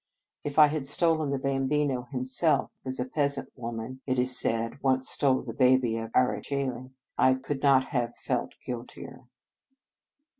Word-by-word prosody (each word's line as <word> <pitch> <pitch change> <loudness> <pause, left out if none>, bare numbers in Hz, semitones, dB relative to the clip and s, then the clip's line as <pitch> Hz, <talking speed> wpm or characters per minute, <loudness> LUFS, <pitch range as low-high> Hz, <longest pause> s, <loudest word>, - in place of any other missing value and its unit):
If 145 0 -5
I 155 - +10
had 150 -2 -2
stolen 155 0 +2
the 140 - 0
Bam 135 0 -1
bino 140 -4 0
himself, 135 +2 +1
as 130 0 -5
a 125 - 0
peasant 140 0 -1
woman, 120 +1 -6
it 130 -1 0
is 125 0 +1
said, 115 +4 -1
once 130 -1 +1
stole 135 -3 +2
the 120 -3 -6
Baby 125 -2 +3
of 115 0 -5
Ara 125 0 +2
Cceli, 130 -2 -4 0.2
I 130 0 +5
could 135 +1 -4
not 135 -2 +4
have 120 -4 -2
felt - - -2
guiltier. 125 +1 -8
130 Hz, 160 wpm, -28 LUFS, 125-140 Hz, 0.2 s, I